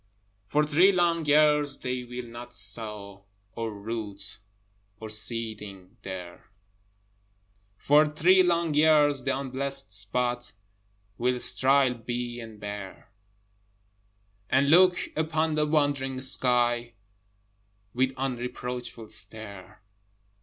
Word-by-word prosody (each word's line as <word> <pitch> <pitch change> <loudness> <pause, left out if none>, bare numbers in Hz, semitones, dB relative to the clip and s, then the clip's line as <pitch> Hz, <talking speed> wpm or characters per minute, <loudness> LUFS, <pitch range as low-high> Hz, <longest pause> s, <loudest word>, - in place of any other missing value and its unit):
For 150 +8 +2
three 165 +6 +5
long 170 -3 +1
years 150 -1 +3
they 125 -1 -4
will 125 0 -7
not 120 +1 -9
sow 105 -1 -5 0.3
Or 115 -1 -4
root 105 -1 -5 0.6
or 110 -1 -7
seedling 105 -4 -3
there: 90 -1 -9 1.3
For 150 +5 +4
three 180 +5 +4
long 170 -3 +1
years 150 -2 +4
the 135 0 0
unblessed 135 -2 -2
spot 120 +5 -2 0.7
Will 125 +1 0
sterile 135 0 +3
be 120 0 -5
and 110 -2 -10
bare, 100 -2 -8 1.4
And 140 +2 +3
look 180 +1 +6 0.2
upon 160 0 0
the 150 0 +1
wondering 145 -3 0
sky 120 -2 +1 1.0
With 130 +1 +1
unreproachful 125 -2 -5
stare. 105 -2 -3
125 Hz, 100 wpm, -27 LUFS, 110-145 Hz, 1.4 s, look